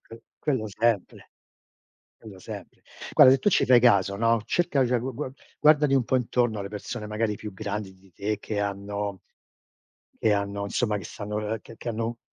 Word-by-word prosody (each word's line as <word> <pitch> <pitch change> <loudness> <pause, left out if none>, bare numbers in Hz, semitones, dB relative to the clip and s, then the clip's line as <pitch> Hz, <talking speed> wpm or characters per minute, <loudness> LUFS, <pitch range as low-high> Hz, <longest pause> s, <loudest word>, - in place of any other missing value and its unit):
qu 115 - -12 0.2
quello 130 -8 -1
sempre, 110 -1 -1 0.9
quello 105 -4 -12
sempre. - - -10 0.3
Guarda 130 - +8
se 135 - +4
tu 205 - +2
ci - - +3
fai 125 -1 +7
caso, 100 -5 +4
no, 115 +1 +2
cerca, 160 -7 +1
cioè, 125 0 +1
gu 130 +2 -4
gua 130 0 -5 0.3
guardati 150 -2 +5
un 130 - +3
po' 130 - +1
intorno 120 -3 0
alle 100 - -5
persone 105 +2 -6
magari 105 0 -1
più 105 -1 -8
grandi 100 -1 -5
di 95 -1 -23
te 105 +4 -2
che 105 -2 -3
hanno 100 -1 -3 1.0
che 110 - +4
hanno 100 0 -1
insomma, 105 +1 0
che 100 - -6
stanno 105 +3 -6
uhm, 105 +1 -2
che 115 - -14
che - - -7
hanno 115 +1 -3
110 Hz, 185 wpm, -26 LUFS, 100-120 Hz, 1.0 s, Guarda